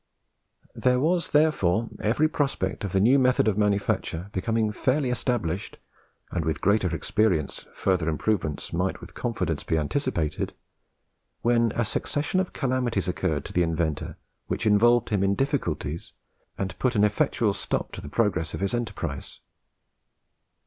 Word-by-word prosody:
There 125 Hz, 0 st, +2 dB
was 170 Hz, +5 st, +1 dB
therefore 115 Hz, -, +3 dB
every 120 Hz, +9 st, +2 dB
prospect 135 Hz, -12 st, -1 dB
of 100 Hz, -, -2 dB
the 95 Hz, -, +2 dB
new 125 Hz, +8 st, +5 dB
method 125 Hz, -3 st, +3 dB
of 105 Hz, -, +3 dB
manufacture 100 Hz, -3 st, 0 dB
becoming 110 Hz, +3 st, 0 dB
fairly 130 Hz, +4 st, +1 dB
established, 105 Hz, -7 st, -2 dB, 0.5 s
and 85 Hz, -, -1 dB
with 80 Hz, -2 st, -1 dB
greater 100 Hz, -2 st, +2 dB
experience 90 Hz, -10 st, 0 dB
further 90 Hz, -4 st, +1 dB
improvements 80 Hz, -2 st, -1 dB
might 90 Hz, +3 st, -1 dB
with -, -, -12 dB
confidence -, -, -2 dB
be 80 Hz, -, 0 dB
anticipated, 80 Hz, -, -1 dB, 0.9 s
when 115 Hz, -1 st, +3 dB
a 120 Hz, -, +1 dB
succession 145 Hz, -, -1 dB
of 185 Hz, -, -1 dB
calamities 125 Hz, -, 0 dB
occurred 90 Hz, -4 st, -1 dB
to -, -, -8 dB
the 90 Hz, -, +3 dB
inventor 80 Hz, -2 st, -1 dB, 0.3 s
which 115 Hz, -, -2 dB
involved 120 Hz, +3 st, +4 dB
him 100 Hz, -3 st, +1 dB
in 100 Hz, 0 st, +2 dB
difficulties 90 Hz, -, -2 dB, 0.4 s
and 95 Hz, -2 st, -4 dB
put 130 Hz, -2 st, +1 dB
an 105 Hz, -, +4 dB
effectual 105 Hz, -1 st, +2 dB
stop -, -, -2 dB
to -, -, -7 dB
the 75 Hz, -, -8 dB
progress 95 Hz, -5 st, 0 dB
of -, -, -6 dB
his 100 Hz, 0 st, -1 dB
enterprise. 100 Hz, -, -4 dB
105 Hz, 145 wpm, -26 LUFS, 90-125 Hz, 0.9 s, new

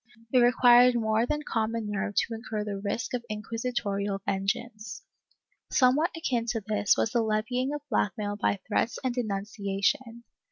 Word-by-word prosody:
It 255 Hz, -, +6 dB
required 245 Hz, 0 st, +6 dB
more 220 Hz, 0 st, +1 dB
than 300 Hz, +2 st, -2 dB
common 225 Hz, -3 st, -2 dB
nerve 205 Hz, 0 st, -2 dB
to 230 Hz, -, +1 dB
incur 220 Hz, -2 st, -4 dB
the 205 Hz, -2 st, -4 dB
risk 220 Hz, +4 st, -3 dB
of 245 Hz, -1 st, -2 dB
inquisitorial 210 Hz, -2 st, -2 dB
vengeance. 210 Hz, -, -3 dB, 0.7 s
Somewhat 270 Hz, +5 st, +3 dB
akin 245 Hz, -7 st, -1 dB
to 225 Hz, -1 st, -1 dB
this 210 Hz, -2 st, +2 dB
was 220 Hz, -, +1 dB
the 235 Hz, -, +2 dB
levying 225 Hz, +5 st, -1 dB
of 295 Hz, 0 st, -4 dB
blackmail 205 Hz, -3 st, -1 dB
by 205 Hz, -1 st, 0 dB
threats 225 Hz, +2 st, 0 dB
of 255 Hz, -2 st, 0 dB
denunciation. 210 Hz, +1 st, -2 dB
225 Hz, 150 wpm, -28 LUFS, 205-245 Hz, 0.7 s, It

